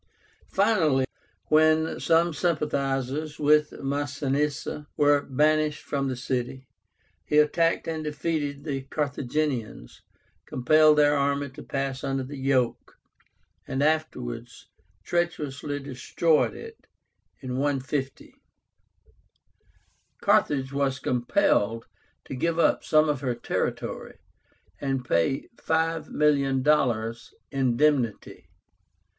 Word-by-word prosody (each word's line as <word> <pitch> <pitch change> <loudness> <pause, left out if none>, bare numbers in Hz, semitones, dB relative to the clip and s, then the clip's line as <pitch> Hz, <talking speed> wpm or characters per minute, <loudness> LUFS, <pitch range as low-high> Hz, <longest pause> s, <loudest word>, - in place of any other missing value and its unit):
Finally, 170 -10 +2 0.4
when 155 +1 +3
some 165 0 +3
sympathizers 150 -2 -1
with 150 0 +4
Masinissa 145 +1 -2
were 145 -1 +4
banished 150 +2 +1
from 140 -1 -2
the 130 - -2
city, 125 +1 -4 0.6
he 150 - 0
attacked 165 +2 +2
and 160 -1 -3
defeated 150 -1 -3
the 140 -4 -3
Carthaginians, 140 - -3 0.5
compelled 155 +4 +4
their 145 0 +5
army 140 0 0
to - - -11
pass 135 -1 -3
under 135 -1 -1
the 135 +2 -8
yoke, 130 -3 0 0.7
and 135 +1 -1
afterwards 125 -6 -2 0.3
treacherously 150 -5 -2
destroyed 145 +4 0
it 455 -1 -11 0.6
(150). 135 +1 -2 1.9
Carthage 135 -2 +2
was 140 -1 0
compelled 120 - +1 0.4
to - - -7
give 165 +6 -1
up 170 - +3
some 155 0 +4
of 145 -3 -1
her 125 -3 -1
territory, 120 - -3 0.6
and 135 -2 -2
pay 105 +6 0
$5,000,000 140 -7 +1 0.2
indemnity. 130 -3 0
145 Hz, 95 wpm, -26 LUFS, 130-155 Hz, 1.9 s, their